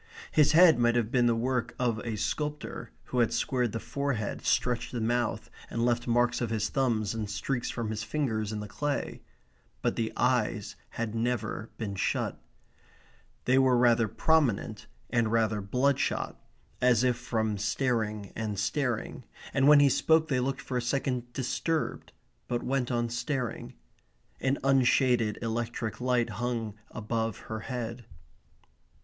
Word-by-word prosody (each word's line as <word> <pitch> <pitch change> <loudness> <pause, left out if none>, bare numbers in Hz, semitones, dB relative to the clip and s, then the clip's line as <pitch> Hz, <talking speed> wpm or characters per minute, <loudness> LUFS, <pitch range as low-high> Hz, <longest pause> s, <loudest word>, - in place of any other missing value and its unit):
His 150 0 +4
head 165 -5 +7
might 120 0 +3
have 115 -2 +1
been 120 -2 +3
the 115 - +3
work 120 0 -1
of 120 -3 0
a 115 -1 -4
sculptor, 150 +8 -3
who 125 - -2
had 120 - +3
squared 125 -4 0
the 115 - -3
forehead, 140 -7 -3
stretched 125 -1 +1
the 120 - -3
mouth, 115 -1 -1 0.2
and 115 0 -1
left 120 0 +1
marks 120 +1 +2
of 120 - -1
his 110 -1 -1
thumbs 115 -6 0
and 110 -2 -3
streaks 120 +4 -2
from 115 -2 -3
his 105 -1 -3
fingers 110 -5 -1
in 105 -1 -3
the 105 - -6
clay. 145 +7 -3 0.6
But - - +1
the 115 -1 -1
eyes 120 -4 +1
had 115 -2 -4
never 115 -1 -2
been 105 -4 -4
shut. 95 - -1 1.0
They 130 +1 +4
were 130 -2 +4
rather 120 -2 +4
prominent, 120 -8 +1 0.2
and 115 -3 +2
rather 110 -2 +1
bloodshot, 125 +8 0 0.5
as 125 -1 +4
if 125 -1 +3
from 110 -4 -2
staring 105 -2 -1
and 110 -2 -3
staring, 120 +4 -1 0.3
and 135 0 +3
when 150 -1 +8
he 140 - +6
spoke 160 +4 +3
they 130 -3 +2
looked 135 +2 -1
for 125 - -3
a - - 0
second 125 -1 -1
disturbed, 150 +5 -2 0.4
but 120 -1 -2
went 130 -2 0
on 120 -1 +1
staring. 120 0 -3 0.6
An 135 +1 +1
unshaded 125 -4 +3
electric 115 0 -3
light 125 -2 +1
hung 115 -3 -2 0.2
above 110 -1 -2
her 110 - -2
head. 120 0 -5
120 Hz, 155 wpm, -29 LUFS, 110-130 Hz, 1.0 s, when